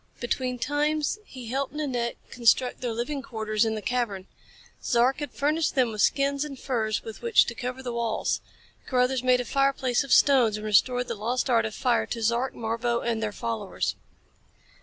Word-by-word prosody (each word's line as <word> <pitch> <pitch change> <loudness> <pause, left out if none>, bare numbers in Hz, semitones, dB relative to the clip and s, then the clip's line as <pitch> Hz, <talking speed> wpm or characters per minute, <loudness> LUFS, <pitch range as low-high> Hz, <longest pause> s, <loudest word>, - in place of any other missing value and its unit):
Between 250 +1 -2
times 295 - 0
he 255 -2 -9
helped 270 +3 -2
Nanette 250 -6 -2 0.2
construct 245 +1 +2
their 245 -2 -2
living 245 +5 -3
quarters 220 -4 -1
in 220 0 -1
the 215 - -5
cavern. 235 -6 -1 0.6
Zark 250 +3 +2
had 290 - -4
furnished 305 +3 0
them 250 -4 +3
with 215 -1 -2
skins 280 0 +2
and 285 -3 -7
furs 220 -5 -1
with 225 -1 -9
which 470 -3 +5
to 240 - -4
cover 250 +2 -5
the 245 -2 -4
walls. 230 -2 -1 0.5
Carruthers 250 0 +2
made 255 -1 +3
a - - -6
fireplace 275 -2 +1
of 275 - -8
stones 245 -7 +5
and 210 - -7
restored 245 +4 +3
the - - -2
lost 240 +5 -1
art 230 -1 +3
of 220 - -4
fire 245 -3 +1
to 230 -1 -4
Zark, 235 +4 0
Marbo 230 +1 -1
and 230 -2 -1
their 215 -1 -1
followers. 115 - -3
245 Hz, 180 wpm, -26 LUFS, 230-270 Hz, 0.6 s, which